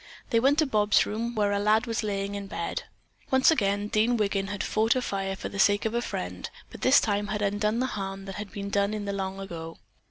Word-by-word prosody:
They 230 - +4
went 275 +5 +3
to 315 - +4
Bobs' 210 -5 +3
room, 230 +3 -3
where 205 -1 +2
a 200 - +1
lad 215 +3 +3
was 230 -2 -1
lying 200 -2 -2
in 200 -1 -5
bed. 170 - -4 0.4
Once 265 +3 +5
again 205 -7 +1
Dean 220 +3 +2
Wiggin 200 -2 0
had 205 -1 -3
fought 220 +2 +2
a 255 - +1
fire 195 -2 -2
for - - -5
the 200 - -7
sake 205 +2 +4
of 220 - 0
a 235 - +1
friend, - - -5 0.2
but - - -11
this 265 +2 +6
time 205 -1 0
had 210 0 -2
undone 205 +2 0
the 255 - +1
harm 195 -5 -5
that 195 - -6
had 205 -1 -6
been 200 0 -5
done 200 +1 +1
in 210 -1 -4
the 200 - -2
long 195 0 -3
ago. 165 -4 -7
205 Hz, 245 wpm, -27 LUFS, 200-225 Hz, 0.4 s, this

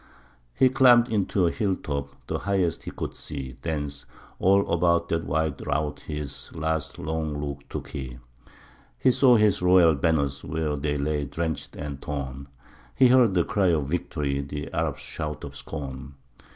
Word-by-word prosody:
He 130 - +5
climbed 125 -2 +6
into 100 -3 +1
a 85 - +2
hill 100 -1 0
top, 70 -3 -5
the - - -2
highest 95 -4 0
he - - -6
could - - -5
see, 65 -4 -6
Thence 75 -2 -4 0.3
all 100 +1 +4
about 85 0 +2
of 85 0 +1
that - - -9
wide 80 -1 -1
rout 75 0 -1
his 70 -4 -6
last 80 -1 -2
long 80 -1 -3
look 70 -1 -6
took - - -6
he; 65 -4 -6 0.8
He 130 - +4
saw 125 0 +5
his 105 -4 +3
royal 90 -2 +6
banners, 70 -2 0
where 80 -2 -2
they 75 +1 -1
lay 75 0 -1
drenched 80 0 -4
and 70 -1 -6
torn, 70 -3 -5 0.5
He 130 -2 +6
heard 120 -6 +5
the 85 - +4
cry 100 -2 +1
of 75 -5 +1
victory, 75 -4 -1
the 75 +1 -6
Arab's - - -1
shout 75 -1 -5
of 70 0 -7
scorn. 70 -1 -7
75 Hz, 165 wpm, -26 LUFS, 70-90 Hz, 0.8 s, climbed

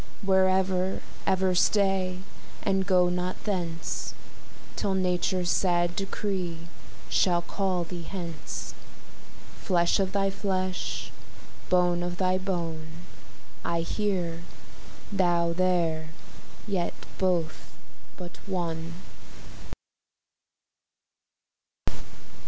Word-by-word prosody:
Where 190 -1 +5
ever, 190 0 +1 0.3
ever 190 -1 +3
stay, 190 -1 +3 0.4
and 190 0 +2
go 180 -2 +5
not 180 +1 -2
thence, 175 -5 -2 0.6
Till 195 -1 0
nature's 180 -1 +1
sad 175 -2 +2
decree 190 -3 -2 0.5
shall 175 -2 +3
call 185 -2 0
thee 175 +1 -6
hence; 170 -2 -5 0.9
Flesh 175 -1 +3
of 190 -1 +1
thy 195 0 +2
flesh, 185 -2 -2 0.6
bone 180 -1 +4
of 175 0 -2
thy 185 0 +2
bone, 170 -4 -2 0.8
I 170 0 +1
here, 175 -3 -1 0.7
thou 175 -3 +3
there, 170 -3 +2 0.6
yet 190 -5 0 0.3
both 175 -4 0 0.4
but 175 -1 -8
one. 165 -3 -2
180 Hz, 85 wpm, -28 LUFS, 175-190 Hz, 0.9 s, Where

